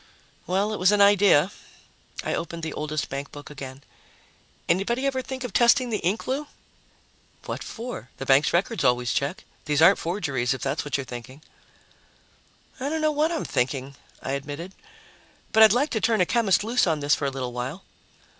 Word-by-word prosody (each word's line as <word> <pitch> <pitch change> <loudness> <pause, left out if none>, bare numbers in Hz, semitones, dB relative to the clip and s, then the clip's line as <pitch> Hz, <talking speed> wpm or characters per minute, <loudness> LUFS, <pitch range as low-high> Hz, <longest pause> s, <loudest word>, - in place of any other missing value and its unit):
"Well, 195 +4 0
it - - -4
was 185 +2 +5
an 210 - +2
idea." 200 -4 +5 0.7
I - - -2
opened 170 0 -4
the 160 - -3
oldest 150 0 -3
bankbook 140 +2 -7
again. 135 -1 -9 0.8
"Anybody 235 +9 +1
ever 265 -1 0
think 260 0 -6
of 245 -6 -5
testing 245 +1 +4
the 210 - 0
ink, 190 +6 -1
Lou?" 280 +3 -2 1.0
"What - - -5
for? 235 - -7
The 135 - -6
banks' 135 +2 +4
records 195 +4 0
always 125 -2 +2
check. 140 +6 -2 0.2
These 150 -1 +1
aren't 175 +5 +6
forgeries, 145 -9 -1
if - - -8
that's 150 - -1
what 145 - -2
you're 140 - -4
thinking." 125 +4 -9 1.4
"I 270 +2 -2
don't 320 +1 -2
know 310 0 +3
what 305 +2 +1
I'm 330 - -2
thinking," 130 +2 -1 0.3
I - - -3
admitted. 145 +6 -5 0.8
"But 220 - +4
I'd 220 -2 +9
like 265 +7 +2
to 220 - -1
turn 225 -2 +2
a 180 - +4
chemist 215 -2 +2
loose 235 -1 +2
on 160 -2 +1
this 145 +1 +2
for 145 - 0
a - - -2
little 130 -2 -4
while." 130 +9 -5
170 Hz, 185 wpm, -25 LUFS, 140-225 Hz, 1.4 s, I'd